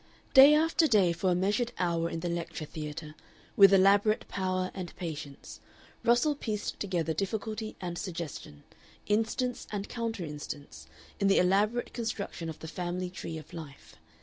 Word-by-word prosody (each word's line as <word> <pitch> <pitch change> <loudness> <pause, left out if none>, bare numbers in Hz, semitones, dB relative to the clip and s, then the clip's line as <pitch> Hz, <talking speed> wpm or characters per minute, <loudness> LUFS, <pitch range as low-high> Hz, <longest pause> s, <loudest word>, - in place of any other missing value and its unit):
Day 280 +2 +9
after 320 +1 +3
day 195 - +4
for 180 +3 0
a 180 - +3
measured 210 +6 0
hour 170 -2 0
in 165 - -4
the 175 - -2
lecture 170 -2 -4
theatre, 150 0 -7 0.4
with 195 -1 +8
elaborate 200 +2 +4
power 185 -1 -1
and 180 -3 -7
patience, 155 -5 -7 0.4
Russell 240 +6 +4
pieced 215 -7 -4
together 175 -5 -1
difficulty 215 +4 -3
and 175 -1 -4
suggestion, 165 - -6 0.4
instance 225 +4 -1
and 205 -1 -3
counter 230 -6 -3
instance, 145 -1 -8 0.3
in 200 - +2
the 195 - +4
elaborate 205 +6 +2
construction 200 -7 -4
of 160 - -7
the 160 - -9
family 180 +2 -3
tree 165 -3 -6
of 155 - -11
life. 155 -5 -10
185 Hz, 150 wpm, -30 LUFS, 165-215 Hz, 0.4 s, Day